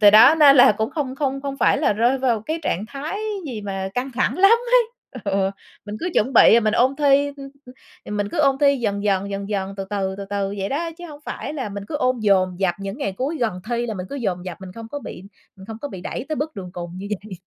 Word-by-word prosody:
từ 205 -1 +8
đó 220 +8 +8
nên 280 -2 +8
là 245 - +8
cũng 220 +2 -2
không 285 -5 -3
không 275 -1 -2
không 275 -1 -4
phải - - +3
là 280 - +2
rơi 240 +5 +2
vào 245 -4 +1
cái 315 +7 -3
trạng 200 -7 -1
thái 295 +9 -5 0.3
gì 235 -6 -5
mà 195 -1 -3
căng 255 +2 -2
thẳng 260 +7 0
lắm 390 +3 +7
ấy 485 +1 +4 0.4
ừa, 195 -1 +1 0.4
mình 205 - -5
cứ 360 - -2
chuẩn 215 - +3
là 265 - -7
bị 235 - +7
mình 215 -1 +1
ôn 260 +3 +3
thi, 285 -1 +4
hưm 285 0 -8
hưm, 275 0 -8 0.5
thì - - -9
mình 205 -1 -1
cứ - - -4
ôn 275 -2 +3
thi 280 -1 +4
dần 205 -4 -2
dần, 200 0 0
dần 200 0 -4
dần, 195 -1 -3
từ 195 - -4
từ, 195 -2 -1
từ 200 - -6
từ 200 0 -2
vậy 195 0 -2
đó, 330 +5 -2
chứ 350 - -8
hổng 295 -2 -11
phải - - -5
là 260 -7 -3
mình 200 0 -6
cứ 295 - -2
ôn 255 -3 +1
dồn 190 -3 +2
dập, 180 -3 +2
những 195 +6 -5
ngày 200 -9 -2
cuối 270 - -3
gần 215 -7 -1
thi 240 0 0
là 220 - -3
mình 185 -1 -5
cứ 280 - -4
dồn 190 -8 -2
dập 180 -2 -7
mình 185 - -9
không 225 +2 -9
có 290 - -3
bị 180 - -9 0.3
mình 190 - -13
không 220 0 -7
có 285 - -3
bị 190 - -8
đẩy 245 +7 -5
tới 310 - -2
bước 295 -5 -4
đường 180 -2 -7
cùng 175 -1 -7
như 200 - -6
vậy. 210 -1 -11
225 Hz, 280 wpm, -22 LUFS, 195-280 Hz, 0.5 s, từ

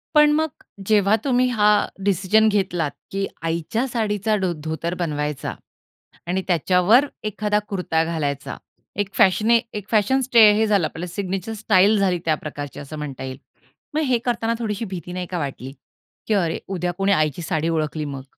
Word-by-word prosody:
पण 300 0 +7
मग, 315 +1 +1 0.4
जेव्हा 210 -1 +4
तुम्ही 255 -2 +2
हा 210 -3 +3 0.2
डिसिजन 200 +3 +3
घेतलात 180 -7 0 0.2
की 195 0 -1 0.2
आईच्या 170 +10 -1
साडीचा 215 -3 0
डो 190 -3 0
धोतर 160 +2 -3
बनवायचा 150 -4 -2 0.7
आणि 185 +2 0
त्याच्यावर 180 - +4 0.2
एखादा 210 0 0
कुर्ता 180 -4 0
घालायचा. 150 -4 -3 0.4
एक 200 -1 -2
फॅशने 220 +3 +4 0.2
एक 205 -1 -7
फॅशन 230 +5 +3
स्टे 230 -4 +6
हे 220 +1 +2
झालं 200 -6 +2
आपल्याला 170 +3 -7
सिग्नेचर 195 +2 -3
स्टाईल 210 -1 +3
झाली 185 -3 +1
त्या 155 -1 +2
प्रकारची, 145 -2 -7
असं 145 +2 -8
म्हणता 140 -3 -6
येईल. 130 0 -6 0.6
मग 310 - +1
हे 255 -4 +2
करतांना 230 -2 0
थोडीशी 220 -1 -3
भीती 180 -2 -7
नाही 180 0 -3
का 180 - -2
वाटली, 135 -2 -5 0.5
की 220 - +1
"अरे, 170 -5 +1
उद्या 180 -2 -2
कोणी 195 +1 +1
आईची 155 -3 +1
साडी 160 -1 -1
ओळखली 155 -1 -1
मग?" 135 -2 -6
190 Hz, 165 wpm, -22 LUFS, 160-215 Hz, 0.7 s, पण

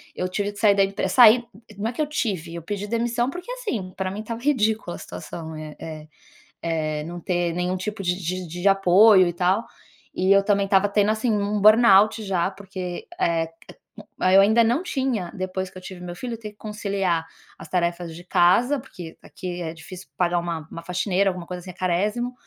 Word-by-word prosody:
eu 185 - -2
tive 205 +2 -2
que 205 - -12
sair 205 -3 +5
da 195 - +4
empre 195 +1 -2
saí 240 -1 +7 0.3
não 220 +3 -2
é - - -6
que 310 - -3
eu 305 - +2
tive, 190 - -3
eu 170 - -5
pedi 205 +4 -4
demissão, 235 +2 0
porque, 360 - -7
assim, 245 - -4
pra 190 -1 -2
mim 200 - -6
estava 230 +1 -6
ridícula 220 -9 +1
a - - -13
situação, 160 -1 -8
eh 155 -1 -8
eh 155 -1 -8 0.5
eh, 155 -2 -2
não 175 +1 -7
ter 175 0 -1
nenhum 180 +1 -1
tipo 200 +1 -5
de 180 0 +1
de 185 +2 -3
de 175 +4 -2
apoio 195 0 +6
e 175 - -2
tal. 185 +5 +1 0.5
E 185 +1 +1
eu 200 0 +6
também 200 -1 +2
estava 195 +1 +3
tendo, 205 0 +2
assim, 220 +2 0
um 205 0 0
burnout 215 0 +6
já, 190 -2 0
porque, 190 -2 -7
eh 165 -1 +1 0.2
eh, - - -14 0.6
eu 195 - +8
ainda 220 +4 +5
não 240 +8 +2
tinha 260 - -2
depois 185 0 -3
que 185 - -14
eu - - -9
tive 185 -1 -9
meu 175 -1 -7
filho, 235 +3 -5
ter 215 -2 -8
que 210 - -27
conciliar 200 -6 -2 0.3
as - - -11
tarefas 170 -2 -1
de 175 - -10
casa, 190 +11 +3
porque 175 -10 -11
aqui 180 -1 -7
é 160 -1 -4
difícil 180 +3 -11
pagar 175 -1 +2
uma 170 -2 -4
uma 165 - -7
faxineira, 185 +2 +1
alguma 180 -2 -5
coisa 180 -1 -5
assim, 185 - -9
é - - -16
carésimo, 205 +8 -1
190 Hz, 210 wpm, -23 LUFS, 175-215 Hz, 0.6 s, eu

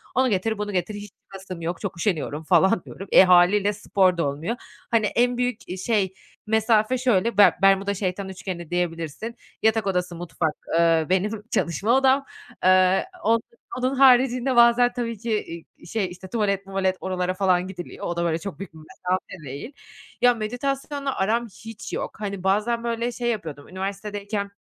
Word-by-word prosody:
"Onu 260 0 +3
getir, 220 +2 0
bunu 210 0 -3
getir. 185 +2 -2
Hiç 205 -1 -8
çıkasım 190 -3 -9
yok, 170 +1 -4
çok 195 -4 -4
üşeniyorum." 160 -4 -2
falan 190 +4 +3
diyorum. 195 - -9
Eee, - - +9
hâliyle 185 +3 +5
spor 190 -3 +2
da 165 - +1
olmuyor. 155 +12 -3 0.4
Hani, 225 -2 +3
en 245 +3 +1
büyük, 250 -2 -2
eee, 180 - -4
şey 195 -1 0 0.3
mesafe 220 +2 +2
şöyle, 235 -4 +1
Ber 205 - +7
Bermuda 195 +1 +4
Şeytan 190 0 -3
Üçgeni 180 -3 -6
diyebilirsin. 175 +5 -3 0.3
Yatak 220 -2 +2
odası, 180 -2 -1
mutfak, 165 -2 -2 0.3
ııı, 165 -1 +3
benim 205 +3 0
çalışma 175 +7 0
odam. 270 +1 +3 0.4
Eee, 185 - +4 0.2
on 230 +1 +3 0.4
onun 255 +2 0
haricinde 255 -1 +4
bazen 240 +1 +5
tabii 230 -3 -3
ki, 230 +2 -4 0.5
i - - -31
i 170 - -12
şey, 200 -1 -1
işte, 180 +1 -10
tuvalet 200 -2 0
muvalet 190 -1 -1
oralara 185 -1 -2
falan 185 -1 +1
gidiliyor. 180 -2 -8
O 175 - -2
da, 170 - 0
böyle, 165 -1 0
çok 195 +4 -7
büyük 195 -4 -8
bir 160 - -13
mesafe 180 +1 -5
değil. 140 - -7 0.5
Ya, 245 0 +6
meditasyonla 275 +5 -3
aram 230 +5 0
hiç 225 +1 -10
yok. - - -4
Hani, 200 -3 -4
bazen, 215 +5 +1
böyle, 235 +1 -1
şey 240 0 -2
yapıyordum, 160 -10 -4
üniversitedeyken 200 +2 -4
200 Hz, 170 wpm, -24 LUFS, 180-230 Hz, 0.5 s, Eee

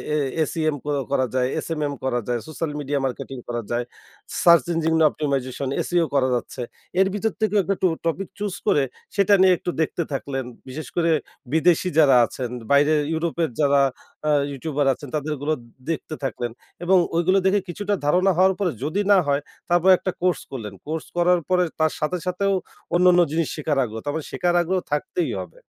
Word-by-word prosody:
এ - - +2 0.3
ACM 155 0 -1
ক - - -12 0.2
করা 130 -2 +2
যায়, 125 -1 +2 0.2
SMM 150 -3 -2
করা 125 -2 0
যায়, 120 -1 0
সোশ্যাল 155 0 -3
মিডিয়া 145 0 -1
মার্কেটিং 135 +1 -4
করা 120 -1 -2
যায়, 120 +1 0 0.6
সার্চ 170 -5 +7
ইঞ্জিন 165 0 +1
অপটিমাইজেশন, 140 -3 -2 0.2
SEO 175 -1 +2
করা 130 -2 +3
যাচ্ছে। 125 +1 -4 0.4
এর 190 - +5
ভিতর 215 +2 0
থেকেও 210 -1 +2
একটু 195 +2 0
ট - - +6 0.2
টপিক 175 +3 -1
চুস 205 -3 -2
করে, 145 -8 +4 0.3
সেটা 200 0 +4
নিয়ে 190 -1 +7
একটু 175 - -5
দেখতে 165 +2 0
থাকলেন। 135 -1 -3 0.2
বিশেষ 150 +5 -6
করে 170 -1 +2 0.4
বিদেশী 170 +2 +3
যারা 140 -4 +6
আছেন, 125 0 -5 0.2
বাইরে 145 +2 +5 0.2
ইউরোপের 165 0 -1
যারা 140 -1 +4 0.5
আ - - +4 0.2
ইউটিউবার 145 +1 -2
আছেন, 145 +2 -10
তাদের 150 0 -2
গুলো 150 +2 +1 0.4
দেখতে 160 -1 -3
থাকলেন। 120 -2 -2 0.3
এবং 185 +2 +4 0.2
ওইগুলো 175 +3 +3
দেখে 195 +2 +4
কিছুটা 205 +4 -2
ধারণা 180 +6 +4
হওয়ার 190 +1 +5
পরে, 190 -4 +1
যদি 155 +8 0
না 200 - +7
হয়, 140 0 +2 0.3
তারপরে 175 +2 +5
একটা 185 - -2
কোর্স 180 -4 +1
করলেন। 110 -7 -6
কোর্স 160 0 -3
করার 175 +1 +4
পরে 180 -1 +3 0.2
তার 155 0 +2
সাথে 150 +4 0
সাথেও, 195 +2 +1 0.4
অন্যান্য 180 0 +5
জিনিস 160 -1 0
শেখার 150 -2 -1
আগ্রহ। 110 -2 -5
তার 145 - -2
মানে 160 - -3
শেখার 175 0 0
আগ্রহ 185 +2 0
থাকতেই 150 - -1
হবে। - - -9
160 Hz, 180 wpm, -23 LUFS, 140-180 Hz, 0.6 s, সার্চ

